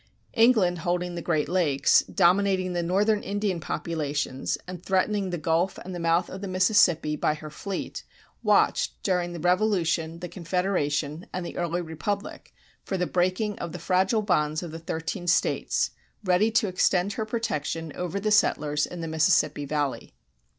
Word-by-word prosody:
[186:1] 225 - +1
England 195 -8 +3
holding 175 +1 -1
the 170 - -4
Great 155 -3 0
Lakes, 160 -7 +3
dominating 185 0 +3
the 175 - 0
northern 205 +5 +2
Indian 200 -3 -2
populations 150 -5 -2
and 180 -1 -8
threatening 195 +1 +1
the 175 - -2
Gulf 165 +4 0
and 185 - -8
the 175 - -5
mouth 170 +1 +2
of 190 - -8
the 200 - -4
Mississippi 185 -5 +3
by 150 - 0
her 155 0 -9
fleet, 195 +5 -5 0.4
watched - - +2
during 180 -2 0
the 170 - -6
Revolution, 175 -3 +1
the 180 - -6
Confederation, 170 -4 -2
and 180 -1 -4
the - - -7
early 175 0 -1
republic 185 +6 -5 0.3
for 190 - -3
the 180 - 0
breaking 185 +4 0
of 165 - -5
the - - -4
fragile 190 +6 +1
bonds 155 -5 +1
of 170 - -6
the 165 - -7
thirteen 165 +3 -4
States, 175 - +1 0.3
ready 185 +3 +3
to 225 -1 +2
extend 185 +1 +1
her 220 - -2
protection 165 -8 -3
over 180 +2 -3
the 215 +2 -1
settlers 150 -7 +2
in 175 - -7
the 165 - -4
Mississippi 155 -2 +2
Valley. 145 -2 -2
180 Hz, 165 wpm, -26 LUFS, 160-195 Hz, 0.4 s, England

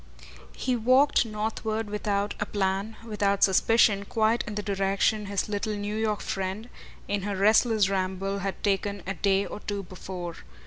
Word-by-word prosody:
He 255 - 0
walked 255 +2 +4
northward 220 0 -2
without 205 -1 -1
a 205 - -2
plan, 195 +2 -1
without 200 -3 +1
suspicion, 200 +1 +4
quite 220 +2 +1
in 210 - -5
the 210 - -2
direction 200 +1 +1
his 200 -1 -1
little 210 +1 -2
New 205 +1 -3
York 215 -1 0
friend, 195 +4 -3 0.4
in 205 0 -1
her 200 +1 -3
restless 215 +1 +4
ramble, 195 +1 -1
had 195 0 -4
taken 200 -1 0
a 195 - -2
day 195 0 +1
or - - -7
two 205 -1 -4
before. 180 -1 -7
205 Hz, 160 wpm, -27 LUFS, 195-215 Hz, 0.4 s, walked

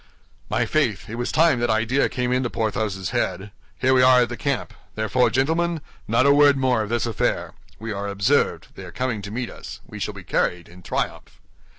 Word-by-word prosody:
"My - - +1
faith, - - 0
it - - -6
was 120 +1 -2
time 160 -5 +3
that 120 0 0
idea 115 +5 +2
came 125 -1 -2
into 125 -1 +1
Porthos's 110 -5 -2
head. 95 +2 -2 0.3
Here 130 +1 +2
we 130 - +5
are 125 0 +6
at 120 - +1
the 120 - -4
camp; 140 +1 -2 0.2
therefore, 110 +3 +2
gentlemen, 160 +8 0 0.3
not 115 +4 +3
a 140 - +6
word 145 -1 +5
more 130 -3 +2
of 105 - -4
this 120 +1 0
affair. 115 -3 -1 0.2
We 110 +1 -6
are 100 0 -4
observed; 100 0 +1
they - - -10
are - - -10
coming 125 -5 -2
to 100 - -7
meet 120 +3 -4
us. - - -9
We - - -10
shall - - -3
be - - -9
carried 90 -1 -1
in 90 +1 -15
triumph." - - -4
120 Hz, 210 wpm, -23 LUFS, 110-130 Hz, 0.3 s, are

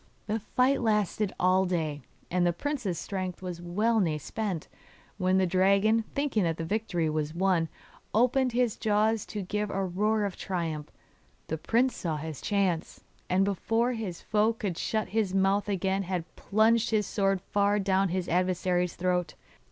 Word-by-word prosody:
The 220 +1 -1
fight 255 +5 +1
lasted 210 -3 +1
all 185 +1 +4
day, 155 -5 -1 0.3
and 180 0 +2
the 175 -1 +3
prince's 240 - -2
strength 185 -2 -4
was 175 -2 -5
well 210 +7 +1
nigh 165 -6 +1
spent, 185 +2 -4 0.5
when 185 0 +3
the 190 - +3
dragon, 200 +5 +3
thinking 280 -6 +1
that 165 -2 0
the 165 - -3
victory 195 -4 -1
was 155 0 -2
won, 175 -3 +2 0.4
opened 250 +3 +3
his 240 -2 +1
jaws 215 0 +1
to 205 -2 -4
give 210 +3 -2
a 195 0 -1
roar 210 +4 +1
of 195 - -3
triumph. 165 -5 -3 0.6
The 160 - -2
prince 240 +9 +2
saw 160 -3 -2
his 155 -2 -6
chance, 190 -5 -1 0.3
and 190 +2 +3
before 225 +5 +1
his 210 -7 -5
foe 215 +1 +2
could 200 -6 -4
shut 215 -1 -1
his 205 -4 0
mouth 195 +2 +2
again 195 0 0
had 180 -3 -3
plunged 225 +2 +2
his 215 -2 +2
sword 195 0 +1
far 205 +2 +1
down 195 -1 +2
his 180 0 -2
adversary's 180 0 +1
throat. 180 0 -1
195 Hz, 165 wpm, -28 LUFS, 180-215 Hz, 0.6 s, all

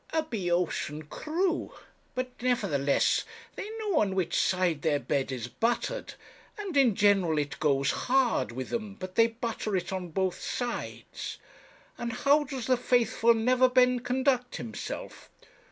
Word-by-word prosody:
'A 320 -1 +2
Boeotian 175 - -1
crew! 335 - -2 0.4
but, 255 0 -2
nevertheless, 185 - +2 0.3
they 410 - -5
know 420 -6 +1
on 195 -2 +1
which 175 -3 0
side 180 -5 +2
their 150 -2 +2
bread 140 -1 -1
is 125 -2 -4
buttered 240 - -2 0.4
and 400 -6 -5
in 255 -7 +5
general 195 -6 +3
it 145 -1 -2
goes 140 -2 +2
hard 250 - +1
with 130 +2 -5
them 215 -4 -4
but 185 -2 -7
they 230 +2 +5
butter 225 -2 -3
it 185 +1 -2
on 185 -1 -3
both 185 +2 -1
sides. 245 -1 -4 0.6
And 235 -1 -2
how 285 +5 +3
does 260 -4 -5
the 255 -1 +3
faithful 235 -1 +3
Neverbend 250 +1 +4
conduct 255 0 +1
himself? 115 -3 -6
225 Hz, 140 wpm, -29 LUFS, 175-255 Hz, 0.6 s, in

